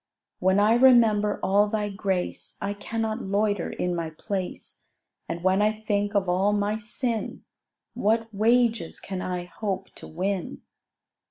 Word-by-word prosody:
When 190 +2 +3
I 210 +2 +5
remember 230 -5 +5
all 205 +2 +4
Thy 210 -1 -1
grace, 195 -2 -3
I 200 +1 -2
cannot 220 +2 -3
loiter 205 -1 0
in 180 -1 -2
my 165 -1 -3
place: 185 +4 -6 0.4
And 170 - -4
when 190 +2 +3
I 210 +1 +4
think 205 -1 -2
of 195 -2 +2
all 190 +3 +2
my 205 +1 0
sin, 225 +1 -3 0.5
What 225 +2 +1
wages 225 -3 +2
can 190 -1 -5
I 180 -1 -3
hope 190 +1 -4
to - - -10
win? 185 +2 -3
205 Hz, 145 wpm, -26 LUFS, 190-215 Hz, 0.5 s, I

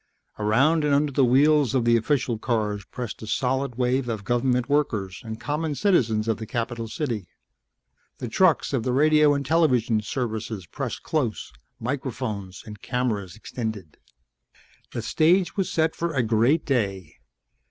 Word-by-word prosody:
Around 135 +10 +3
and 145 -1 +3
under 145 0 +1
the 135 0 +2
wheels 140 +1 +4
of 125 -3 +2
the 120 0 +5
official 120 -1 0
cars 105 -4 -1
pressed 120 -2 -7
a 110 - -7
solid 130 +2 -1
wave 125 +1 0
of 110 -3 -3
government 120 +2 +1
workers 110 -10 -1
and 110 -1 -6
common 150 +5 -2
citizens 115 - +2
of 110 -2 +1
the 110 - -7
capital 115 0 -3
city. 115 - -3 0.9
The 125 - -5
trucks 165 +5 +2
of 130 - +1
the 125 +2 -1
radio 150 +1 +4
and 140 0 -3
television 125 -8 +2
services 110 -3 -4
pressed - - -5
close, 125 - -2 0.3
microphones 120 -7 -4
and 105 -1 -10
cameras 110 -8 -2
extended. 110 -7 -6 0.9
The - - -4
stage 175 +4 +2
was 195 -3 -1
set 160 0 +1
for 170 -2 -2
a 125 - +2
great 115 +8 +2
day. 100 - -2
125 Hz, 150 wpm, -25 LUFS, 110-145 Hz, 0.9 s, the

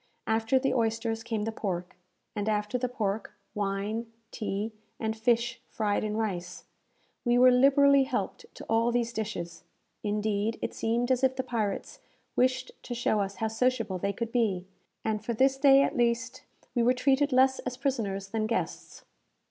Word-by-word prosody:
After 225 +3 +2
the 265 0 +1
oysters 225 -1 0
came 225 -2 -2
the 225 - -2
pork, 180 -5 -4 0.4
and 210 0 -1
after 210 +2 -1
the 250 0 -1
pork, 215 -4 -2 0.2
wine, 210 +3 -2 0.2
tea, 210 0 -3 0.3
and 220 -1 -1
fish 235 +1 +1
fried 210 -4 0
in 215 0 -2
rice. 180 -5 -3 0.6
We 240 -1 +3
were 255 +1 +7
liberally 275 +2 +5
helped 290 - -3
to - - -9
all 230 +1 +2
these 235 -1 0
dishes. 175 -7 -4 0.4
Indeed, 210 +1 -1
it - - -3
seemed 235 +3 0
as 255 0 +1
if 260 0 +3
the 260 - -2
pirates 225 -5 -3 0.4
wished 255 +1 +1
to 245 - -5
show 235 -3 +1
us 200 0 -2
how 225 - -1
sociable 225 -4 0
they 200 +2 0
could 230 +3 -4
be, 210 -7 +1 0.4
and 215 -1 -1
for 235 +1 -2
this 265 +3 +4
day, 275 0 +6
at - - -1
least, 235 +1 0 0.3
we 240 - +1
were 245 +2 +4
treated 275 +3 +2
less 260 +1 +4
as 250 -1 -5
prisoners 210 -8 -2
than 215 +1 -1
guests. 230 - -3
225 Hz, 170 wpm, -29 LUFS, 210-255 Hz, 0.6 s, were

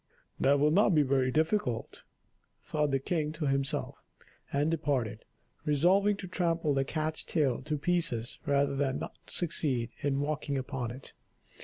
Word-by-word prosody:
"That 140 +1 +4
will 150 +1 +4
not 195 +1 +4
be 150 - +5
very 130 -1 +2
difficult," 155 - 0 0.6
thought 150 -1 0
the 135 - +2
king 150 +2 -1
to 155 -1 -3
himself, 135 -1 -1 0.5
and 145 +3 +1
departed, 130 -9 -1 0.4
resolving 185 +7 +3
to 195 - -7
trample 170 -4 0
the 135 0 +2
cat's 155 +2 -2
tail 140 -7 0
to 150 +2 -2
pieces 145 -8 0
rather 140 -1 +2
than 135 -1 0
not - - -6
succeed 145 -8 0
in 140 -1 0
walking 145 -1 -2
upon 130 -2 -3
it. 130 +3 -10
145 Hz, 150 wpm, -30 LUFS, 135-160 Hz, 0.6 s, be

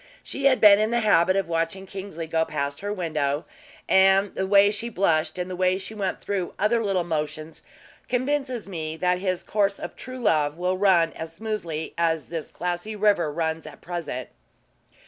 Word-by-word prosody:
She 275 - -4
had 265 -2 +5
been 205 -1 +8
in 215 +1 +2
the 235 0 +1
habit 185 -4 +4
of 195 -3 0
watching 165 +3 -2
Kingsley 190 -4 -6
go 160 0 +1
past 140 -2 -3
her 205 +1 -3
window; 155 -6 -1 0.4
and 195 +1 +4
the 190 - -2
way 200 +1 +6
she 230 +3 -3
blushed, 170 -7 +1
and 180 0 -3
went 190 +2 -1
through 195 -3 -3
the - - -3
other 230 +2 +2
little 195 -4 +1
motions, 155 -1 -4 0.5
convinces 255 -2 -1
me 160 -4 -5
that 180 +1 +1
his 185 -2 -2
course 200 -1 +1
of - - -7
true 255 0 -8
love 155 -10 +1
will 180 +1 0
ran 185 -4 +3
as 165 0 -7
smooth 175 -7 -4
as 165 -2 0
this 165 -2 -5
glassy 180 +4 -4
river 200 -7 +2
runs 160 0 -2
at 145 -2 -11
present." 165 -8 -5
185 Hz, 175 wpm, -25 LUFS, 160-205 Hz, 0.5 s, been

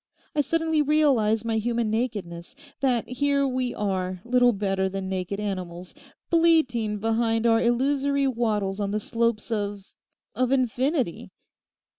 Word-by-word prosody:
I 300 - +2
suddenly 320 0 +1
realise 265 -8 +2
my 225 -1 0
human 235 -1 -1
nakedness: 210 -4 -3 0.2
that 250 -4 +1
here 280 +2 +1
we 255 -1 -2
are, 185 -3 -2
little 245 0 +4
better 195 -2 -1
than 195 0 -4
naked 190 +1 -3
animals, 185 -3 -5 0.4
bleating 310 -11 +3
behind 225 +1 0
our 225 -1 +4
illusory 275 +3 +1
wattles 215 -6 -1
on 200 -1 -1
the 210 +1 -1
slopes 230 +1 -1
of—of 205 +3 -4
infinity. 260 - 0
230 Hz, 125 wpm, -25 LUFS, 205-260 Hz, 0.4 s, little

